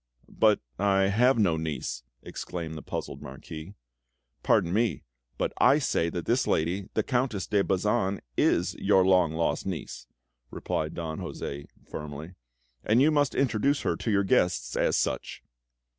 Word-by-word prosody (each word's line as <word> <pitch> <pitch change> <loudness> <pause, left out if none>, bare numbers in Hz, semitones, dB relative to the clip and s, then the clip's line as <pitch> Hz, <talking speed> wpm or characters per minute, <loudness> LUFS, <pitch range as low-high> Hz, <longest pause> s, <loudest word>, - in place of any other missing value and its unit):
"But 110 -2 +3 0.2
I 95 -1 +3
have 125 +5 +4
no 95 -7 +3
niece," 75 -5 -4 0.2
exclaimed 85 -3 -6
the 80 - -7
puzzled - - -5
Marquis. 80 +7 -9 0.7
"Pardon 85 - +2
me, 110 - +1 0.3
but - - -1
I 135 +4 +6
say 105 - 0
that 85 0 -4
this 120 +2 +1
lady, 90 +5 0
the - - +2
Countess 125 -6 -1
de 100 -2 +2
Bazan, 100 +1 0 0.2
is - - +2
your 95 -1 +4
long 90 -4 +4
lost 85 +3 -1
niece!" 90 -6 -6 0.4
repeated 80 +5 -3
Don 80 -2 -4
José 70 0 -6 0.2
firmly. 75 +3 -7 0.5
"And 110 +3 +3
you 150 +4 +5
must 145 -3 +2
introduce 135 +2 +1
her - - 0
to - - -3
your 100 -1 +3
guests 90 -2 +1
as - - +2
such!" - - -2
95 Hz, 150 wpm, -27 LUFS, 80-110 Hz, 0.7 s, I